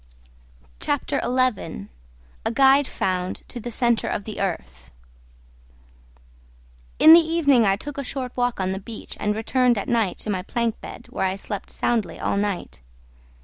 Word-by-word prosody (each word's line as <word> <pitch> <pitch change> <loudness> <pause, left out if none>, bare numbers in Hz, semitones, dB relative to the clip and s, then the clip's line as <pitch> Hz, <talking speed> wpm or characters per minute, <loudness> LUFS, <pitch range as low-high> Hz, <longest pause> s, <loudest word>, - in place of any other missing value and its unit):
CHAPTER - - -1
XI. 245 - -1 0.6
A - - -1
GUIDE 270 +2 +5
FOUND 185 -1 -2
TO 245 - -8
THE 240 - -6
CENTRE 235 0 +1
OF 205 - -2
THE 215 -1 -6
EARTH 65 - -4 2.1
In 315 - +9
the 335 - +10
evening 315 -7 +3
I 195 - +3
took 285 +7 -6
a - - -2
short 255 -1 -4
walk 245 -2 0
on 190 0 0
the 190 - -3
beach 215 +2 -9
and 210 0 0
returned 245 +2 +2
at 200 - -3
night 225 -6 +1
to 215 - -3
my 185 -2 -1
plank 230 +3 -2
bed, - - -9
where 190 - 0
I 190 - -2
slept 200 0 -6
soundly 235 -3 -1
all - - -1
night. 200 - -3
225 Hz, 160 wpm, -23 LUFS, 195-255 Hz, 2.1 s, the